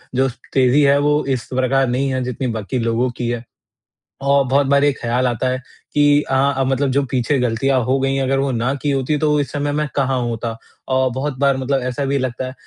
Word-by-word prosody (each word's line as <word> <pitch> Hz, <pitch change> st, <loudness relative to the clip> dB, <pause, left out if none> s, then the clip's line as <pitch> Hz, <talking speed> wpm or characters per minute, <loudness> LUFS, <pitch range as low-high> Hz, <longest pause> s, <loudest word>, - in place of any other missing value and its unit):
जो 135 Hz, +1 st, +2 dB, 0.2 s
तेज़ी 130 Hz, +2 st, +4 dB
है, 140 Hz, 0 st, +4 dB
वो 150 Hz, +1 st, +2 dB
इस 130 Hz, -3 st, -2 dB
प्रकार 130 Hz, +1 st, +2 dB
नहीं 130 Hz, +3 st, 0 dB
है, 130 Hz, 0 st, -1 dB
जितनी 125 Hz, +1 st, -3 dB
बाकी 110 Hz, +4 st, -3 dB
लोगों 115 Hz, +2 st, 0 dB
की 120 Hz, -, -1 dB
है। 120 Hz, -1 st, -3 dB, 0.8 s
औ 140 Hz, 0 st, +3 dB
बहुत 140 Hz, +1 st, +3 dB
बार 140 Hz, 0 st, +4 dB
ये 145 Hz, -, +4 dB
ख़्याल 125 Hz, +1 st, -1 dB
आता 120 Hz, +1 st, -1 dB
है 130 Hz, -, -1 dB, 0.4 s
कि, 145 Hz, 0 st, +4 dB
"हाँ, 135 Hz, +1 st, +2 dB
अब 135 Hz, -1 st, +1 dB
मतलब 135 Hz, +1 st, +1 dB
जो 140 Hz, +2 st, +2 dB
पीछे 130 Hz, +2 st, +1 dB
गलतियाँ 125 Hz, +2 st, +1 dB
हो 135 Hz, +2 st, +1 dB
गयी 135 Hz, 0 st, 0 dB
हैं, 135 Hz, -, 0 dB
अगर 135 Hz, +1 st, +1 dB
वो 135 Hz, 0 st, 0 dB
ना 125 Hz, +2 st, 0 dB
की 145 Hz, -, 0 dB
होती, 135 Hz, +2 st, 0 dB
तो 150 Hz, 0 st, +2 dB
इस 140 Hz, -2 st, -2 dB
समय 145 Hz, 0 st, -2 dB
मैं 150 Hz, +1 st, -1 dB
कहाँ 135 Hz, -2 st, +1 dB
होता।" 115 Hz, -1 st, -3 dB, 0.4 s
अ, 130 Hz, 0 st, +2 dB
बहुत 135 Hz, 0 st, -3 dB
बार 140 Hz, -1 st, +3 dB
मतलब 135 Hz, 0 st, -1 dB
ऐसा 130 Hz, +2 st, -2 dB
भी 140 Hz, +1 st, 0 dB
लगता 130 Hz, -1 st, -3 dB
है 130 Hz, -, -6 dB
135 Hz, 230 wpm, -19 LUFS, 125-140 Hz, 0.8 s, तेज़ी